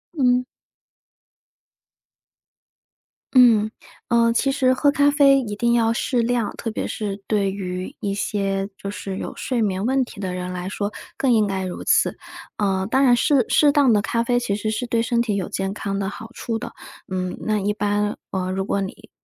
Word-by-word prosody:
嗯。 250 -3 +3 2.9
嗯， 225 -4 +6 0.4
呃， 235 -1 +4
其 275 +3 +1
实 260 -1 +3
喝 285 +2 +3
咖 285 0 +4
啡 280 -2 +5
一 215 -6 -4
定 235 +3 +1
要 230 -1 +3
适 240 +1 0
量， 235 -2 0
特 230 - -4
别 220 - -3
是 205 -2 -4
对 200 -3 +1
于 185 -2 -5
一 200 -1 -2
些 195 -1 -1
就 200 - -5
是 195 -1 -5
有 - - -5
睡 250 -2 -2
眠 195 -2 0
问 265 0 +2
题 220 - -12
的 185 -2 -3
人 180 0 -4
来 180 +1 -4
说， 205 +1 -3 0.3
更 265 - +2
应 215 -2 +3
该 190 -1 -2
如 180 - -6
此， - - +3 0.4
呃， 190 -2 0
当 265 +1 +4
然 245 -3 +6
适 265 +2 +3
适 295 -1 +5
当 285 -3 +4
的 210 -2 +4
咖 230 +2 0
啡 245 +1 +1
其 220 -5 -1
实 215 +1 -2
是 220 +3 -2
对 235 -1 0
身 235 +1 0
体 220 -4 -1
有 190 -3 -2
健 195 0 -2
康 200 -1 -3
的 195 -1 -2
好 225 +2 -9
处 225 -1 -3
的。 - - -7 0.4
嗯， 185 -1 -2
那 215 -1 0
一 205 +1 0
般， 205 0 -1
呃， 185 -1 -2
如 190 0 -2
果 200 - 0
你， 195 - -7
215 Hz, 205 characters per minute, -22 LUFS, 195-245 Hz, 2.9 s, 嗯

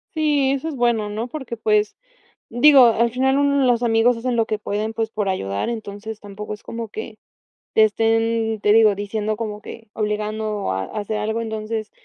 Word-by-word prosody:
Sí, 295 -4 +2
eso 275 +3 -2
es 310 - -4
bueno, 235 -4 +1
¿no? 220 +3 -4
Porque, 255 -3 -6
pues, 210 -1 +1 0.5
digo, 260 +1 +7
al 230 +1 +3
final 265 +3 +1
uno 280 -1 +2
los 245 -1 +2
amigos 235 +1 +3
hacen 240 +1 -2
lo 225 - +2
que 215 - -2
pueden, 210 +1 -3
pues, 225 -1 -2
por 210 -2 -2
ayudar, 100 - -2
entonces, 220 -1 -6
tampoco 210 +1 -7
es 210 - -14
como 230 -1 -6
que 215 +1 -8 0.6
te 220 - +6
estén, 225 0 +1
te 205 - +3
digo, 215 -1 +5
diciendo 210 +1 -2
como 210 -1 -5
que 225 +1 -11
obligando 215 - -2
a 95 0 -2
a 215 - -6
hacer 210 +1 -3
algo, 220 +2 -2
entonces, 220 -1 -4
220 Hz, 190 wpm, -21 LUFS, 210-235 Hz, 0.6 s, digo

